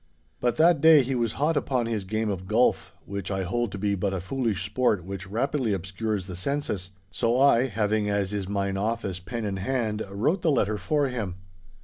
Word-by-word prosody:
But 120 -1 +1
that 160 -1 +4
day 160 -3 +8
he 135 +2 -2
was 120 -3 0
hot 150 +3 +1
upon 130 -4 0
his 110 -4 -2
game 110 +2 -1
of 95 -1 -5
golf 115 +5 +2
(which 100 -2 -5
I 95 -1 -1
hold 120 +4 -1
to - - -4
be 100 +1 0
but 100 0 -1
a - - -2
foolish 105 -2 -2
sport 105 -3 +1
which 95 0 -6
rapidly 125 +1 0
obscures 95 +2 -3
the 90 -1 -7
senses), 100 -3 -2 0.2
so 120 +1 +1
I, 135 -2 +5
having, 105 -2 0
as 100 -1 0
is 100 -2 -3
mine 100 -1 -1
office, 100 -3 -2
pen 105 +5 -5
in 100 -2 -2
hand, 110 0 -1
wrote 115 - 0
the 165 - +2
letter 110 -7 +1
for 145 -2 +1
him. 110 -8 -3
110 Hz, 205 wpm, -26 LUFS, 95-125 Hz, 0.2 s, day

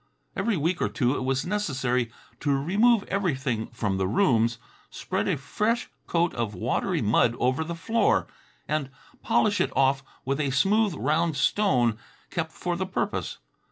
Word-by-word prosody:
Every 225 -5 0
week 165 +3 0
or - - +1
two 130 -1 +1
it - - -3
was 135 0 0
necessary 130 - -1 0.3
to 145 - 0
remove 200 - +3
everything 135 - -1
from 105 -4 -2
the 95 - +1
rooms, 115 - +2 0.3
spread - - -3
a - - +1
fresh 210 - -1 0.2
coat 170 0 +1
of 115 -4 -3
watery 90 - -1
mud 115 +2 +3
over 130 +5 +1
the 170 +1 -5
floor, 230 - +2 0.4
and 150 -3 -1 0.3
polish 205 -1 +2
it - - 0
off 135 0 +3 0.2
with 135 +2 -1
a 140 -2 +1
smooth, 195 +8 +2
round 155 +2 0
stone 125 - +2 0.3
kept 160 -1 -2
for 175 +1 -3
the 190 +2 -2
purpose. 185 - -2
145 Hz, 155 wpm, -26 LUFS, 125-190 Hz, 0.4 s, remove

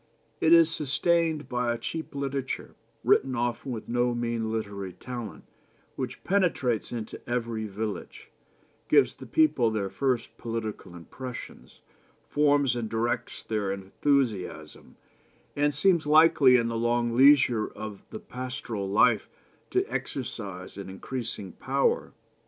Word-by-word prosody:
It 160 - +3
is 165 -1 +7
sustained 160 0 +1
by 125 -2 0
a 120 - -1
cheap 160 +6 -5
literature, 135 -1 -3 0.3
written 130 -1 +3
often 120 +2 -2
with 115 -3 -6
no 120 0 +1
mean 115 -2 -2
literary 100 -4 -4
skill, 120 -4 -7 0.5
which 130 -1 -5
penetrates 165 - +1
into 115 -2 -6
every 115 -2 -2
village, 105 +1 -6 0.6
gives 425 - +5
the - - -12
people 310 - +3
their 100 -3 -2
first 130 -4 -1
political 110 -5 -5
impressions, 115 - -9 0.5
forms 145 -4 +3
and 115 -2 -3
directs 115 +2 -1
their 105 -3 -1
enthusiasm, 100 - -2 0.6
and 145 +1 +2
seems 165 +2 +2
likely 150 -4 +6
in 120 -2 +3
the 115 -1 -2
long 120 0 +1
leisure 130 -4 +5
of 105 -2 -8
the 220 - -7
pastoral 125 - -5
life 110 +2 +3 0.4
to - - +1
exercise 95 -1 -5
an 100 -1 -7
increasing 110 -1 -5
power. 135 +7 0
120 Hz, 125 wpm, -27 LUFS, 110-140 Hz, 0.6 s, is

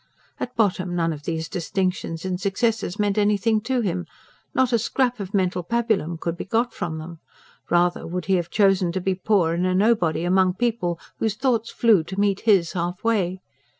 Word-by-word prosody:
At 250 - -5
bottom, 185 -5 +1
none 165 -1 +1
of 145 -1 -10
these 160 -1 -2
distinctions 180 -1 -2
and 185 0 -2
successes 210 -1 0
meant 205 -1 +1
anything 210 +1 +2
to 255 +2 0
him; 180 -4 -2 0.4
not 260 -1 +1
a 235 - +4
scrap 245 +1 0
of 200 0 -5
mental 185 -2 +1
pabulum 215 -5 0
could 170 0 -2
be - - -5
got 230 +4 0
from 160 -2 -4
them: 160 +1 -8 0.5
rather 175 0 +2
would 180 0 -4
he 190 - +1
have 175 -1 -3
chosen 195 -4 +3
to 190 - -1
be 190 +1 0
poor 185 -3 +1
and 175 +2 0
a 185 - +1
nobody 185 -6 +2
among 185 +1 +3
people 205 -7 -1 0.2
whose 220 -2 0
thoughts 230 -2 0
flew 220 -8 +3
to 190 +3 -5
meet 200 -1 +2
his 195 -7 +3
half 175 +1 -3
way. 190 -5 0
190 Hz, 190 wpm, -23 LUFS, 175-220 Hz, 0.5 s, a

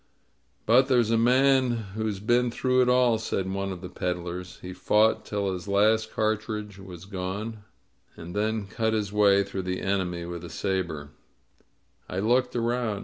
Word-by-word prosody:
^^But 125 +4 +5
there's 120 -4 +3
a - - +4
man 130 +2 +4 0.2
who's 110 -2 -2
been 120 +4 +2
through 130 +2 +1
it 125 - +3
all," 125 -3 +4
said 95 -3 -2
one 100 0 -2
of 90 -2 -7
the 90 - -6
peddlers. 90 +1 -4
"He 90 0 -8
fought 105 +4 +2
till 100 -2 -2
his 90 +1 -7
last 110 +2 +2
cartridge 110 -2 -2
was 95 -2 -10
gone, 100 +3 -5 0.5
and 85 +3 -9
then 110 0 0
cut 110 +2 -1
his 105 -2 -2
way 100 -1 +5
through 100 -1 -5
the 90 0 -3
enemy 90 -3 -1
with 85 0 -6
a 85 - -7
saber." 85 -7 -3 1.0
I 90 - -4
looked 125 +5 +1
around. 115 -3 -1
105 Hz, 165 wpm, -26 LUFS, 95-115 Hz, 1.0 s, ^^But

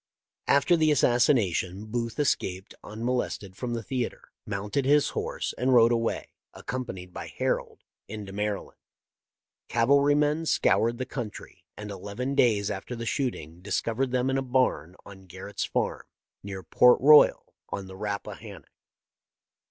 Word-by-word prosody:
" - - -46
After 140 +5 +3
the 155 -2 +3
assassination 110 - +2
Booth 115 0 -3
escaped 95 -10 -1
unmo 120 +4 -2
lested 95 -2 -8
from 120 +2 -4
the 115 - -4
theatre, 125 +2 -4 0.2
mounted 105 +8 -2
his 145 +2 +3
horse, - - -3
and 130 +1 +3
rode 115 0 +6
away, 115 -1 -1 0.2
accompanied 95 -8 -6
by - - -6
Harold, - - -3 0.2
into 105 -2 -7
Maryland. 105 0 -4 0.9
Cavalrymen 145 +5 +3
scoured 115 -4 +2
the 130 - -3
country, 120 -5 -8
and 105 -1 -7
eleven 100 +8 -4
days 110 -7 +2
after 100 +6 -5
the 115 0 -5
shooting 90 - -3
discovered 115 +6 -1
them 130 +1 0
in 135 - +1
a - - -1
barn 125 -9 0
on 95 -1 -13
Garrett's - - -5
farm, - - -2 0.3
near 95 -1 -7
Port 125 +8 +5
Royal 150 +2 +6 0.2
on 100 -1 -5
the 95 0 -11
Rappa 100 0 -4
hannock. - - -12
115 Hz, 145 wpm, -27 LUFS, 100-130 Hz, 0.9 s, rode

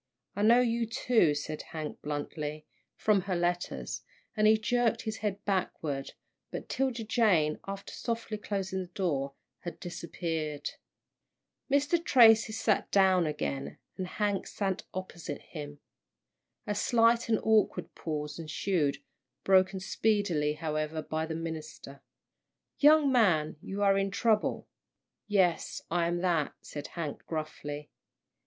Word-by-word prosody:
"I 205 - -2
know 235 +4 +6
you, 235 -1 +1
too," 225 - +3
said 150 +1 -4
Hank, 155 -2 -6
bluntly, 150 +1 -4 0.3
"from 210 -3 +3
her 185 0 -2
letters," 175 0 -2 0.3
and 215 -1 +4
he 220 0 +6
jerked 230 +1 +1
his 220 -1 -3
head 205 -1 -3
backward, 155 -8 -2 0.4
but - - -6
'Tilda 260 -3 -1
Jane, 200 -10 +2
after 195 0 -6
softly 230 -2 -3
closing 190 -2 -2
the 185 - -4
door, 150 -7 -1 0.3
had 175 - -7
disappeared. 165 -3 -4 1.0
Mr. 290 +5 +2
Tracy 225 -6 +6
sat 215 -1 +1
down 190 -4 +4
again, 140 -2 -3 0.2
and 185 -1 -4
Hank 205 +1 -1
sat 195 -2 -2
opposite 175 -5 -6
him. 145 -2 -8 0.9
A 210 - -1
slight 230 +2 +3
and 220 - +3
awkward 220 -1 +2
pause 150 -1 -4
ensued, 155 -3 -1 0.4
broken 190 0 +4
speedily, 185 -6 +1
however, 155 0 -2
by 160 +1 -2
the 160 - -3
minister. 160 -4 -7 0.8
"Young 295 -1 +6
man, 180 -12 +3
you 200 +1 -3
are 195 -1 +4
in 195 0 0
trouble." 215 +2 +1 0.6
"Yes, 190 -5 +1
I 170 0 +2
am 175 0 -1
that," 170 -5 +1
said 145 -1 -7
Hank, 160 -4 -5
gruffly. 150 -2 -5
185 Hz, 130 wpm, -30 LUFS, 155-215 Hz, 1.0 s, know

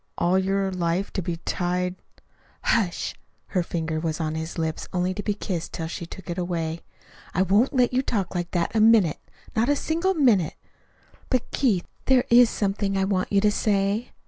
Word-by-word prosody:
All 180 +2 +3
your 195 0 0
life 180 +1 -1
to 190 - -1
be 170 -1 -3
tied 180 +1 -1 0.4
" - - -34
"Hush!" 195 -7 0 0.4
Her 185 - +1
finger 160 -2 -2
was 160 -1 -2
on 155 -1 -1
his 160 +2 -5
lips 160 -1 -2
only 180 0 0
to 205 - -4
be 210 0 -1
kissed 180 -5 -4
till 165 - -3
she 165 +1 -6
took 190 - -10
it 175 +1 -3
away. 170 -2 -2 0.6
"I 185 - +4
won't 205 +7 +3
let 250 -1 +3
you 255 - +3
talk 205 -8 -2
like 175 -1 -2
that 175 +4 -1
a - - +4
minute 215 -8 +5 0.4
not 230 +3 +2
a 290 - +4
single 335 +6 0
minute! 225 - +3 0.7
But, 255 -2 0
Keith, 215 -10 +1 0.2
there 260 -2 +4
is 240 0 +7
something 195 -1 -1
I 195 - +2
want 190 -1 0
you 200 -1 +4
to 210 0 +4
say." 205 +2 0
190 Hz, 195 wpm, -25 LUFS, 175-215 Hz, 0.7 s, is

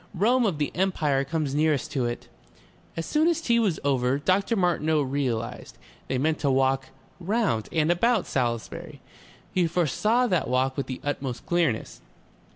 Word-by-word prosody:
"Rome 235 +6 +3
of 175 -7 -1
the 145 -1 -1
Empire 155 -7 +1
comes 150 -1 -2
nearest 150 -2 +1
to 130 -4 0
it...." 120 0 -4 0.7
As 165 - -2
soon 310 +2 +2
as 340 -2 +2
tea 235 -8 +2
was 200 -8 +1
over, 135 -1 +1
Dr. 190 +9 +1
Martineau 160 -5 +1
realized, 125 -4 -3 0.3
they 130 - -1
meant 155 +4 0
to 140 - +1
walk 135 0 +2 0.3
round 180 - 0
and 160 0 +2
about 225 +4 +2
Salisbury. 120 -3 -3 0.5
He 180 -2 +2
foresaw 210 - +1
that 180 -8 0
walk 130 +1 +1
with 140 - -3
the 130 - -6
utmost 135 -4 -4
clearness. 165 -10 -1
150 Hz, 160 wpm, -26 LUFS, 130-185 Hz, 0.7 s, Rome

